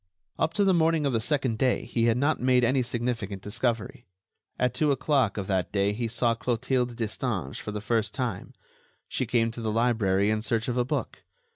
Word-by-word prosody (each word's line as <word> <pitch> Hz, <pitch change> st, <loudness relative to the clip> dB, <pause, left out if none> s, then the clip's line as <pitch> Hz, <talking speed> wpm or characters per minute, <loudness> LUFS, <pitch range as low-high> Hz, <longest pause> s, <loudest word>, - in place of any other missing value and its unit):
Up 160 Hz, -, 0 dB
to 205 Hz, -, +3 dB
the 195 Hz, -1 st, +4 dB
morning 165 Hz, -2 st, +2 dB
of 140 Hz, -, +1 dB
the 115 Hz, -, +2 dB
second 130 Hz, -2 st, 0 dB
day 130 Hz, -2 st, +1 dB
he 115 Hz, -1 st, 0 dB
had 115 Hz, 0 st, +3 dB
not 145 Hz, +4 st, +1 dB
made 125 Hz, -1 st, +3 dB
any 130 Hz, +2 st, +3 dB
significant 115 Hz, -5 st, -3 dB
discovery. 115 Hz, +1 st, -2 dB, 0.5 s
At 125 Hz, -1 st, +1 dB
two 150 Hz, -2 st, +2 dB
o'clock 135 Hz, -6 st, +1 dB
of 100 Hz, -, -2 dB
that 95 Hz, -2 st, -1 dB
day 100 Hz, 0 st, +1 dB
he 115 Hz, +2 st, -2 dB
saw 115 Hz, +1 st, +1 dB
Clotilde 125 Hz, +1 st, -1 dB
Destange 110 Hz, -, -3 dB
for 105 Hz, -, -5 dB
the 105 Hz, 0 st, -4 dB
first 110 Hz, -1 st, 0 dB
time; 120 Hz, -8 st, -4 dB, 0.5 s
she -, -, -2 dB
came 115 Hz, -1 st, +2 dB
to 115 Hz, -, -7 dB
the 110 Hz, -1 st, -1 dB
library 105 Hz, -4 st, +2 dB
in 110 Hz, 0 st, 0 dB
search 115 Hz, 0 st, 0 dB
of 125 Hz, -, -1 dB
a 125 Hz, -, +2 dB
book. 125 Hz, -, -3 dB
120 Hz, 205 wpm, -27 LUFS, 110-130 Hz, 0.5 s, the